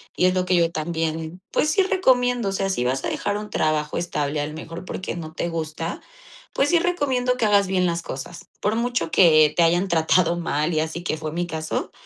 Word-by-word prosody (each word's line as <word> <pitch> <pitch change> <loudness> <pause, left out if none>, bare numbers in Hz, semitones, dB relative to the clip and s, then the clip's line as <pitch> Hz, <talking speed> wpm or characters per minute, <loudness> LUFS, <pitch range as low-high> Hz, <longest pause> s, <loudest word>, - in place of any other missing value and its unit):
y - - +2
es 185 - +4
lo 185 0 0
que 185 - +2
yo 170 -1 +3
también, 160 +1 -3
pues 305 - +1
sí 390 - +3
recomiendo, 250 - +2
o - - -2
sea, 195 0 -1
si 125 -10 -1
vas 135 +2 -1
a - - -1
dejar 205 0 -2
un 210 0 -7
trabajo 155 -4 0
estable, 150 -4 -2
a 145 - -1
lo 150 - -8
mejor 165 +2 -8
porque 185 - -5
no 160 -2 -7
te 170 - -2
gusta, 165 0 -4 0.5
pues 275 - +2
sí 345 - +4
recomiendo 265 -8 +1
que 240 - -2
hagas 200 -2 +4
bien 185 -1 +1
las 170 -1 0
cosas. 135 +3 -8
Por 210 +2 +1
mucho 235 -8 -1
que 155 -4 +6
te 170 - +5
hayan 175 +3 +2
tratado 170 +1 +2
mal, 165 -1 -1
y 155 - +1
así 160 +2 -3
que 160 - -2
fue 155 0 -5
mi 175 +1 -2
caso, 160 -1 -3
170 Hz, 230 wpm, -23 LUFS, 160-200 Hz, 0.5 s, que